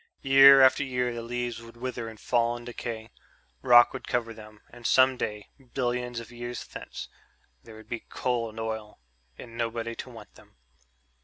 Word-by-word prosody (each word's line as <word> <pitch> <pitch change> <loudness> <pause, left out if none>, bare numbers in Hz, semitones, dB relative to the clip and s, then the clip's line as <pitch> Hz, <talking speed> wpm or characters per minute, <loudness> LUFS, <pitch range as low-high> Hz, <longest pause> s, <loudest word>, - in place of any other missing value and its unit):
Year 135 0 +8
after 130 +2 +5
year 125 -2 -1
the 120 - -5
leaves 120 0 -4
would 115 0 -14
wither 120 -2 -5
and 110 -1 -13
fall 120 -1 +1
and 120 - -12
decay. 115 -2 -6 0.5
Rock 120 -2 +6
would - - -8
cover 115 -2 -1
them. 110 -1 -14
And 120 -1 -5
some 130 0 +5
day... 105 -4 -5 0.3
billions 125 -1 -2
of 115 0 -11
years 120 0 -6
thence... - - -9 0.6
there 115 - -13
would 110 - -14
be 120 - -4
coal 120 -3 -2
and 110 +1 -10
oil 110 -3 -5 0.4
and 115 -2 -11
nobody 115 0 -3
to - - -7
want 110 -4 -13
them. - - -20
120 Hz, 175 wpm, -27 LUFS, 115-125 Hz, 0.6 s, Year